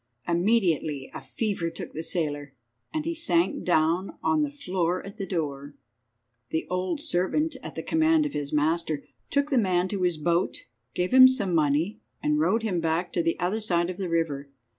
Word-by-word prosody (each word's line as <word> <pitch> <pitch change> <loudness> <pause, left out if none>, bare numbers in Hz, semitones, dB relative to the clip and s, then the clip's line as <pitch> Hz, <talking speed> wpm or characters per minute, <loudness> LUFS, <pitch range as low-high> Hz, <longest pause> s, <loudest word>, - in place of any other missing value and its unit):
Immediately 170 -7 +1
a - - -6
fever 200 -7 -2
took 165 - -8
the 160 - -4
sailor, 145 -5 -2 0.4
and 310 -1 -2
he 335 - -1
sank 180 - +1
down 170 +2 +1
on 310 -1 +2
the 295 - +1
floor 185 -11 -2
at 200 +2 -10
the 195 - -3
door. 145 -5 -3 0.7
The 160 - -1
old 185 - -1
servant, 300 - 0
at - - -8
the - - -4
command 320 -1 +3
of 290 - -3
his 145 -1 -3
master, 155 0 0 0.3
took 285 +1 +1
the 265 - +4
man 185 -3 +2
to 200 -1 -3
his 175 -3 +1
boat, 170 +3 0 0.3
gave 180 +6 -1
him 260 0 +10
some 220 -9 0
money, 155 +5 +1 0.2
and 150 0 +1
rowed 190 +9 +2
him 190 -6 0
back 165 +2 -1
to 170 - +1
the 165 0 -1
other 185 +5 0
side 175 -4 +1
of 180 - -9
the 190 -3 -3
river. 150 -4 -1
175 Hz, 185 wpm, -26 LUFS, 160-215 Hz, 0.7 s, him